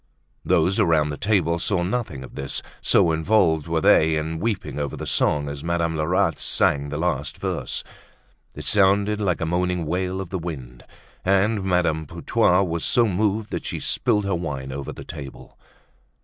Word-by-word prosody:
Those 95 +4 +2
around 80 -7 +3
the 75 - -3
table 85 -3 +1
saw 90 0 0
nothing 90 - -3
of - - -12
this, 65 0 -4 0.2
so 85 - +4
involved 80 -2 +2
were 80 -1 0
they 80 +1 +5
in 80 +1 -3
weeping 95 - -2
over 70 -2 -3
the - - -5
song 75 -1 +1
as 70 0 -6
Madame 85 -1 0
Lerat 85 +1 +1
sang 70 0 +1
the 75 - -4
last 75 -4 -2
verse. - - -3 0.7
It - - -7
sounded 100 +1 +3
like 90 -4 0
a - - 0
moaning 90 0 0
wail 90 +3 -2
of 95 -3 -5
the 95 - -2
wind 65 -8 -7 0.4
and 100 +2 +2
Madame 85 -4 +1
Putois 90 +6 +2
was 85 -1 -3
so 120 -1 +3
moved 105 +2 0
that - - -4
she - - -3
spilled 105 -1 0
her 100 - 0
wine 70 -6 -4
over 70 +1 -5
the - - -10
table. 70 -4 -10
85 Hz, 175 wpm, -23 LUFS, 75-95 Hz, 0.7 s, they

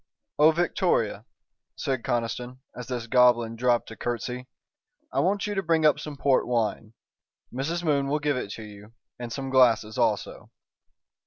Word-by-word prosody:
"Oh, 150 +1 +7
Victoria," 155 - 0 0.5
said 130 -3 -2
Conniston, 120 +1 -2 0.2
as 125 -1 -7
this 120 -3 -4
goblin 120 -1 +3
dropped 120 0 +1
a - - -8
curtsey, 125 +2 -4 0.7
"I - - +1
want 200 +3 +1
you 210 - -2
to 195 - 0
bring 165 -3 +1
up 150 -1 +4
some 150 -1 -7
port 135 -1 +2
wine. 115 -2 -1 0.6
Mrs. 160 +7 -2
Moon 140 -4 +1
will 145 +2 +1
give 145 -1 0
it 125 -5 -4
to 110 - -8
you 105 +1 -13 0.3
and 120 -1 -6
some 135 +1 -4
glasses 115 -4 +3
also." - - -1
125 Hz, 160 wpm, -26 LUFS, 115-150 Hz, 0.7 s, Oh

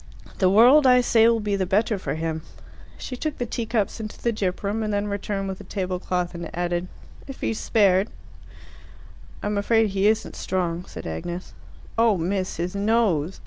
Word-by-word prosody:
The 185 - +4
world, 250 +8 +7
I 250 0 +6
say, 230 -2 +4
will 230 -1 +3
be 210 -1 -1
the 190 -2 -1
better 210 +2 +1
for - - -3
him." 160 0 -3 0.6
She 255 - -6
took 310 +4 -3
the 245 - -2
teacups 225 -2 -2
into 215 -1 -7
the 235 - 0
gyp 190 -3 -2
room, 205 +3 -1
and 215 -1 -1
then 205 0 0
returned 200 -1 -3
with 190 0 -5
the - - -9
tablecloth, 180 -2 -2
and 170 -1 -6
added, 175 0 -1 0.4
"if 270 - -9
he's 225 - -1
spared." 200 -2 +3 1.3
"I'm 205 0 0
afraid 225 0 +2
he 195 +1 +2
isn't 220 0 0
strong," 180 -1 -2
said - - -9
Agnes. 170 - -5 0.5
"Oh, 225 -3 +4
miss, 185 +2 -2
his 175 +2 -3
nose! 200 -6 +1
200 Hz, 180 wpm, -24 LUFS, 180-225 Hz, 1.3 s, world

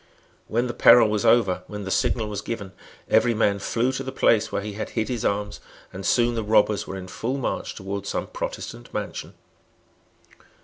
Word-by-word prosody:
When 120 +3 0
the 120 - -3
peril 115 -1 +7
was 105 -1 +1
over, 95 -6 +4
when 105 -1 -6
the 95 - -5
signal 110 +2 +1
was 105 -1 -4
given, 105 -4 -5 0.4
every 120 -2 +3
man 100 -2 +2
flew 120 +5 0
to 135 0 -4
the 130 - -5
place 110 -4 +2
where - - -2
he 105 0 -5
had 105 - -5
hid 110 -1 0
his 120 -3 -2
arms; 105 +1 -1 0.3
and 95 +1 -7
soon 120 +5 +3
the 115 - -1
robbers 105 -1 +2
were 95 - -5
in 95 -1 -8
full 125 +8 -3
march 135 - -3
towards 100 0 -5
some - - -2
Protestant - - -6
mansion. - - -5
110 Hz, 190 wpm, -24 LUFS, 100-120 Hz, 0.4 s, peril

